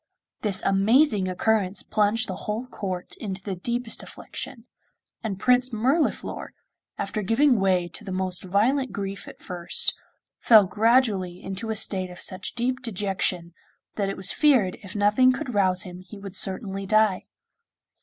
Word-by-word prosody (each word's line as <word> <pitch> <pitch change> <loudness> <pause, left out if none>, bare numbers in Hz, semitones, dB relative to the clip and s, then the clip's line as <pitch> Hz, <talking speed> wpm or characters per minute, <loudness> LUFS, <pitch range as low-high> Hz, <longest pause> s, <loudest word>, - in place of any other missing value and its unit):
This 200 -3 +1
amazing 205 +2 +3
occurrence 195 0 0
plunged 215 +1 +1
the 185 - -4
whole 215 +4 -2
court 190 -7 -5
into 195 -3 -6
the 195 -2 -4
deepest 235 +5 -2
affliction, 255 -4 -8 0.6
and 200 -4 -4
Prince 250 +2 +3
Mirliflor, 260 +8 -1 0.4
after 215 - -3
giving 235 +4 +3
way 185 -2 +2
to 215 - -6
the 195 - -7
most 185 -1 -2
violent 235 +9 +1
grief 200 -1 -5
at - - -11
first, 175 -2 0 0.5
fell 215 -4 +7
gradually 205 -3 +2
into 195 +4 -3
a 220 - -1
state 190 -3 +1
of 180 - -11
such 185 -2 -1
deep 255 +2 -1
dejection 190 -6 -1 0.4
that 200 -2 -1
it 195 - -4
was 190 +1 +1
feared 255 -12 +3
if 195 -1 -10
nothing 210 +5 +4
could 255 -1 -4
rouse 185 -3 +3
him 180 -1 -9
he 185 +3 -12
would 195 -1 -8
certainly 195 +1 -1
die. 215 -2 +2
205 Hz, 155 wpm, -25 LUFS, 185-230 Hz, 0.6 s, fell